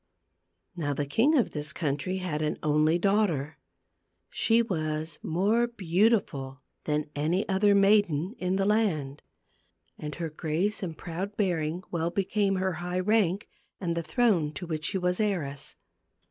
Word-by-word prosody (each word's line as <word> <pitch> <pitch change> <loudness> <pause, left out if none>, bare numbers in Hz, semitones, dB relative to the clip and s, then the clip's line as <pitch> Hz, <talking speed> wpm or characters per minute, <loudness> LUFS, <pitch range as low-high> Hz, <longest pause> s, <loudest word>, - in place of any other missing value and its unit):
Now 145 -5 -2
the 145 - -1
king 245 - +3
of 245 - +2
this 150 0 -3
country 155 +4 -2
had 175 -5 -3
an 155 - -1
only 155 +2 +3
daughter. 175 -6 +1 0.7
She 230 +1 +3
was 155 -5 -3
more 210 +8 +1
beauti 185 - +1 0.3
than 150 0 -1
any 165 +7 0
other 200 +1 +3
maiden 195 -3 +3
in 180 +1 0
the 195 0 +1
land; 170 -10 0 0.8
and 150 -2 -5
her 165 -2 -4
grace 170 +8 -1
and 165 -5 -5
proud 190 +4 -5
bearing 175 -3 0
well 170 -1 0
became 195 +2 0
her 190 0 0
high 180 +1 -2
rank, 200 -1 +1 0.3
and 170 -3 -2
the 170 - -1
throne 165 -2 +1
to 180 - -6
which 155 -2 -3
she 195 - +1
was 180 -1 0
heiress. 155 -10 -2
175 Hz, 145 wpm, -28 LUFS, 155-200 Hz, 0.8 s, king